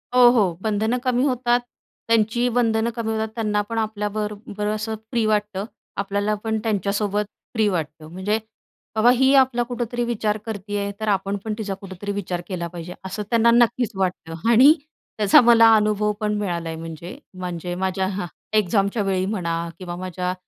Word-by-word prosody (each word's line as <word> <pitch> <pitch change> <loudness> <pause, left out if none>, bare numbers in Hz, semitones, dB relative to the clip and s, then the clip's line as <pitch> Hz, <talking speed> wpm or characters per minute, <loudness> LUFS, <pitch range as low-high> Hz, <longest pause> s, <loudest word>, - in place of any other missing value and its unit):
हो, 250 -1 +8
हो. 205 -8 +3
बंधनं 220 +3 0
कमी 255 -1 +2
होतात, 245 -3 +2 0.5
त्यांचीही 230 +2 +2
बंधनं 230 -1 +1
कमी 225 -2 -2
होतात. 220 0 -1
त्यांना 210 -2 0
पण 230 - -3
आपल्याबरोबर 210 -1 -3
असं 215 +1 -2 0.2
फ्री 235 -3 +1
वाटतं. 210 -2 0 0.3
आपल्याला 200 +1 0
पण 220 -1 0
त्यांच्यासोबत 205 0 0 0.3
फ्री 220 -3 +2
वाटतं, 160 -4 -3
म्हणजे 195 +5 -1 0.6
बाबा 220 +2 +5
ही 265 +2 +4
आपला 260 -3 +4
कुठेतरी 240 0 -3
विचार 220 -3 -1
करती 205 -2 -4
आहे, 200 0 -2
तर 220 - -3
आपण 195 -1 +1
पण 220 - -1
तिचा 210 -3 -3
कुठेतरी 195 +1 -6
विचार 180 -3 -3
केला 175 -3 -3
पाहिजे 170 +1 -8
असं 195 +3 -4
त्यांना 235 0 +4
नक्कीच 240 0 +3
वाटतं 180 -1 -3
आणि 260 +6 +8 0.4
त्याचा 210 +1 +6
मला 230 -1 +7
अनुभव 210 0 +2
पण 210 -1 0
मिळाला 175 -5 -2
आहे 160 - -4
म्हणजे 165 - -8 0.2
म्हणजे 180 -1 -4
माझ्या 190 +1 -1 0.5
एक्झामच्यावेळी 195 -1 +1
म्हणा 180 -5 -2 0.2
किंवा 175 -2 -6
माझ्या 180 0 -3
210 Hz, 160 wpm, -23 LUFS, 190-225 Hz, 0.6 s, हो